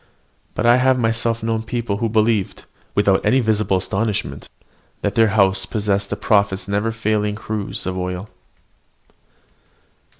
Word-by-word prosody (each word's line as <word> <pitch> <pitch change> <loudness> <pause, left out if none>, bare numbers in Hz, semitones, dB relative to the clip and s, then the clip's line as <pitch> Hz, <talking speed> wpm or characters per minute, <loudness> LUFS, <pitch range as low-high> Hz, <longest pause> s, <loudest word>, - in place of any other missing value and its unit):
But 105 - -1
I 120 +1 +6
have 130 0 +3
myself 115 -1 0
known 115 -1 0
people 115 -3 -3
who 115 +1 -1
believed, 110 -2 0 0.3
without 100 -2 +3
any 130 - +3
visible 110 -5 +1
astonishment, 95 -5 -2 0.5
that - - -1
their 115 -1 +4
house 95 -2 +2
possessed 100 -2 -1
the - - -2
prophet's 100 -2 +1
never 100 +3 0
failing 105 -2 -1
cruse 110 -2 -5
of 95 0 -3
oil. 90 +2 -4
105 Hz, 135 wpm, -20 LUFS, 100-115 Hz, 0.5 s, I